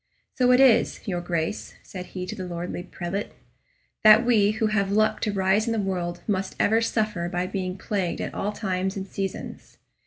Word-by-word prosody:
"So 250 -1 +3
it 250 - +5
is, 260 -4 +4
your 175 -3 -1
Grace," 170 +1 -3
said 180 -1 -8
he 180 -1 -6
to 215 - -6
the 185 -3 -6
lordly 175 0 -4
prelate, 180 +2 -5 0.7
"that 215 +2 +8
we 215 -4 +4
who 220 +1 0
have 205 -2 +1
luck 215 +1 +2
to 215 - 0
rise 195 +2 +2
in 230 - +1
the 225 - 0
world 175 -3 -3
must 195 -2 -2
ever 225 +2 +3
suffer 215 -6 -1
by 180 0 -1
being 185 -1 -3
plagued 190 -2 -2
at - - -4
all 205 - -2
times 190 -2 -2
and 195 0 -5
seasons. 195 -1 -6
195 Hz, 190 wpm, -25 LUFS, 180-215 Hz, 0.7 s, that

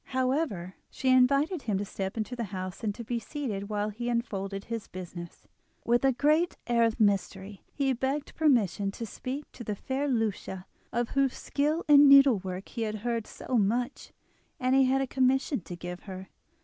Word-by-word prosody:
However, 255 - 0 0.2
she 260 - -1
invited 275 +6 +4
him 210 -6 -1
to 205 - -2
step 195 +1 -5
into 220 +3 -3
the 235 -2 -3
house 185 0 -6
and 220 +2 -3
be 235 +1 -2
seated 220 -6 -4
while 210 0 -1
he 240 +3 -4
unfolded 195 -4 -2
his 230 -1 -5
business. 175 -2 -9 0.4
With 240 +2 +3
a 270 - +5
great 305 +7 +2
air 235 -1 +3
of 225 -1 -1
mystery 200 -1 0
he 270 -2 0
begged 270 +4 -2
permission 230 - +2
to 230 - -5
speak 260 +6 -5
to 240 - -9
the 210 -2 -3
fair 265 +7 -2
Lucia, 215 -6 -2 0.3
of 240 0 -1
whose 275 -2 +1
skill 300 +4 -1
in 290 -1 +8
needlework 200 -10 +5
he 230 - -5
had 215 -1 -1
heard 230 -2 -1
so 250 -3 -2
much, 240 +6 -1 0.5
as 255 -1 +1
he 270 0 +5
had 265 +1 +2
a - - +1
commission 265 -1 +1
to 175 +1 -8
give 175 +1 -7
her. 190 -1 -9
235 Hz, 180 wpm, -29 LUFS, 200-270 Hz, 0.5 s, in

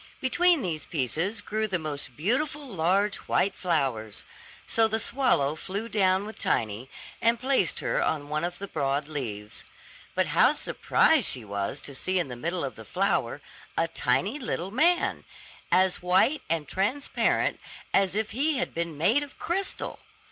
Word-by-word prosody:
Between 340 +2 +3
these 155 -5 -3
pieces 165 - -1
grew 215 +1 -1
the 190 -3 0
most 145 -5 -6
beautiful 280 - 0
large 195 +1 +1
white 195 - +2
flowers; 135 - -1 0.4
so 225 -1 +3
the 220 +1 -1
swallow 225 - +2
flew 200 +7 -4
down 195 -3 +2
with 215 - -9
Tiny, 110 +3 -1 0.3
and 230 0 +3
placed 260 - +1
her - - 0
on 145 -2 0
one 150 +1 -1
of 175 +1 -3
the 200 - -6
broad 145 -3 -1
leaves. 110 -9 -6 0.5
But - - +1
how - - +5
surprised - - +2
she 125 -4 -2
was 100 +6 -3
to 140 - -8
see 185 +8 -1
in 175 -6 0
the 125 - -5
middle 170 +7 -2
of 130 -5 -4
the 110 - -9
flower, 195 - 0 0.4
a - - +2
tiny 295 - 0
little 195 - -3
man, 340 - +2 0.5
as 185 0 +3
white 185 +12 +3
and 160 -3 0
transparent 210 - 0 0.3
as 195 -1 +3
if 220 +1 -1
he 285 +6 +1
had 260 - -2
been 170 -2 -3
made 220 - +3
of 290 -2 -8
crystal! 380 +3 -2
185 Hz, 160 wpm, -27 LUFS, 145-225 Hz, 0.5 s, how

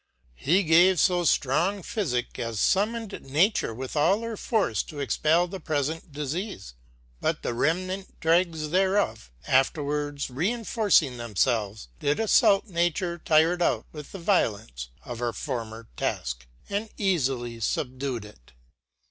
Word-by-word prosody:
He 180 +7 +3
gave 175 +3 +5
lb 175 +1 +3 0.2
ftrong 175 +9 0
phyfick 130 - -2
as 115 -2 -3
fummoned 210 - 0
Nature; 160 - +1
with 130 +5 -6
all 190 +8 +3
her 230 -1 -4
force 200 - 0
to 150 - -9
expell 155 +4 +2
the 190 +2 -7
pre(ent 155 +1 -2
diieafe, 150 - -5 0.5
but - - -1
the - - -1
rem 160 +9 +1
nant 190 +1 -7
dregs 165 -2 +1
thereof 185 - +1 0.2
afterwards 145 +2 0
reiniorcing 190 - +1
themfelves 110 - -1
did 145 +1 +1
aflault 200 -2 +4
Nature 175 -2 -1
tired 165 +2 +3
out - - +1
with 150 -2 -9
the - - -7
violence 110 - -1 0.2
of 120 -2 -6
her 120 -1 -1
former 115 -4 -5
task, - - -3 0.2
and 205 +2 -3
eafily 135 - 0
fubdued 125 0 -2
it. 65 -15 -17
155 Hz, 130 wpm, -26 LUFS, 120-185 Hz, 0.5 s, gave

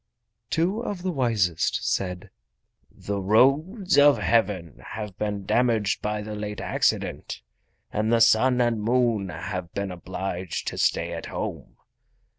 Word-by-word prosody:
Two 180 +7 +1
of 205 -6 -5
the 185 - 0
wisest 110 - 0
said: 90 -1 -2 0.6
"The 100 0 -5
roads 145 - +3
of 145 -2 +7
Heaven 95 -4 0
have 105 -3 -6
been 105 -2 -2
damaged 110 -2 +1
by 105 0 -2
the 105 0 -6
late 105 -1 -5
accident, - - -1 0.5
and 110 +1 0
the 115 - +4
Sun 120 +3 +4
and 120 -3 +1
Moon 115 -3 +1
have 85 +2 -5
been 100 -1 -2
obliged 90 0 -5
to - - -7
stay - - +1
at - - -6
home. - - -6
105 Hz, 135 wpm, -25 LUFS, 95-125 Hz, 0.6 s, of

